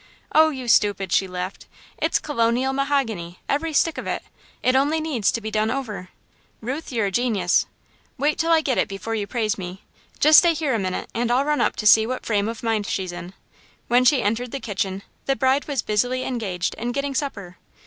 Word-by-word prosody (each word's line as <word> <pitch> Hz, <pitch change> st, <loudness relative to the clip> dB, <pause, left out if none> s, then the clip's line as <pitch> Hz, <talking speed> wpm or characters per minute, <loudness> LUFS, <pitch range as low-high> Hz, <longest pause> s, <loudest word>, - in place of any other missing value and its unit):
"Oh, 315 Hz, +1 st, +6 dB
you 260 Hz, -5 st, -6 dB
stupid," 205 Hz, -5 st, +2 dB
she 190 Hz, -, +2 dB
laughed, 180 Hz, +1 st, -6 dB, 0.3 s
"it's -, -, +2 dB
colonial 250 Hz, -1 st, 0 dB
mahogany, 240 Hz, -11 st, -1 dB
every 315 Hz, +3 st, 0 dB
stick 320 Hz, +2 st, +1 dB
of -, -, -6 dB
it! -, -, -2 dB, 0.4 s
It 255 Hz, -, +3 dB
only 290 Hz, +4 st, +2 dB
needs 290 Hz, -10 st, 0 dB
to 230 Hz, -, -3 dB
be 220 Hz, 0 st, -5 dB
done 215 Hz, 0 st, +1 dB
over!" 225 Hz, -8 st, -4 dB, 0.5 s
"Ruth, 270 Hz, +8 st, -5 dB
you're 225 Hz, -4 st, 0 dB
a 195 Hz, -, -1 dB
genius." 210 Hz, -6 st, +1 dB, 0.5 s
"Wait 295 Hz, +3 st, 0 dB
till 330 Hz, +1 st, +1 dB
I 325 Hz, -1 st, +5 dB
get 265 Hz, -5 st, 0 dB
it, -, -, +2 dB
before 200 Hz, +2 st, -5 dB
you 210 Hz, -2 st, -2 dB
praise 215 Hz, -4 st, -1 dB
me. 185 Hz, +1 st, -7 dB, 0.4 s
Just 305 Hz, +1 st, +8 dB
stay 340 Hz, -2 st, +3 dB
here 300 Hz, -4 st, -1 dB
a 225 Hz, -, +1 dB
minute 185 Hz, -2 st, -3 dB
and 235 Hz, +1 st, -1 dB
I'll 255 Hz, +3 st, +2 dB
run 300 Hz, 0 st, +1 dB
up -, -, +1 dB
to 215 Hz, -, -5 dB
see 220 Hz, +1 st, +7 dB
what 255 Hz, +1 st, -4 dB
frame 205 Hz, -2 st, +1 dB
of 230 Hz, +1 st, -6 dB
mind 220 Hz, -3 st, 0 dB
she's 185 Hz, -2 st, -2 dB
in." 175 Hz, +1 st, -8 dB, 0.6 s
When 245 Hz, +1 st, +4 dB
she 255 Hz, 0 st, +4 dB
entered 230 Hz, +4 st, -1 dB
the 275 Hz, -, -5 dB
kitchen, 195 Hz, -3 st, -3 dB, 0.2 s
the 270 Hz, -, +2 dB
bride 265 Hz, +2 st, +1 dB
was 280 Hz, -5 st, -1 dB
busily 245 Hz, +5 st, 0 dB
engaged 200 Hz, -9 st, -2 dB
in 240 Hz, +2 st, -2 dB
getting 275 Hz, +1 st, -2 dB
supper. 205 Hz, -, -4 dB
235 Hz, 210 wpm, -23 LUFS, 205-275 Hz, 0.6 s, Just